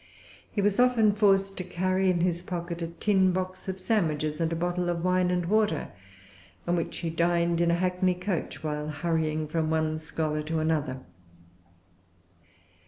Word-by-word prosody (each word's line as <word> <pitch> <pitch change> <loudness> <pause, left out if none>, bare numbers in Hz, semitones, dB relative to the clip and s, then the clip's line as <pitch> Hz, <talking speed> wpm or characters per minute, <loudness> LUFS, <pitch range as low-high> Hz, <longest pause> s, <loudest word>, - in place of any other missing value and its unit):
He 205 - -1
was 205 +2 +2
often 245 -4 +5
forced 195 -1 +2
to 185 - -3
carry 185 +1 0
in 175 -2 +1
his 175 -1 +1
pocket 175 -1 -5
a 165 - -2
tin 190 +2 +2
box 185 +1 -4
of 190 0 -4
sandwiches, 155 -7 0
and 165 0 +1
a - - 0
bottle 175 +1 -1
of 170 -1 -2
wine 185 0 +2
and 180 -1 0
water, 205 -4 +1 0.8
on 175 - +2
which 165 - -3
he 165 -2 -3
dined 170 0 +1
in 170 - +3
a 170 - +3
hackney 180 +1 +1
coach, 180 -3 -3
while 150 -1 -3
hurrying 155 0 -1
from 155 0 -1
one 155 0 0
scholar 155 -1 -2
to 160 +2 -3
another. 155 -5 -1
175 Hz, 170 wpm, -27 LUFS, 160-185 Hz, 0.8 s, often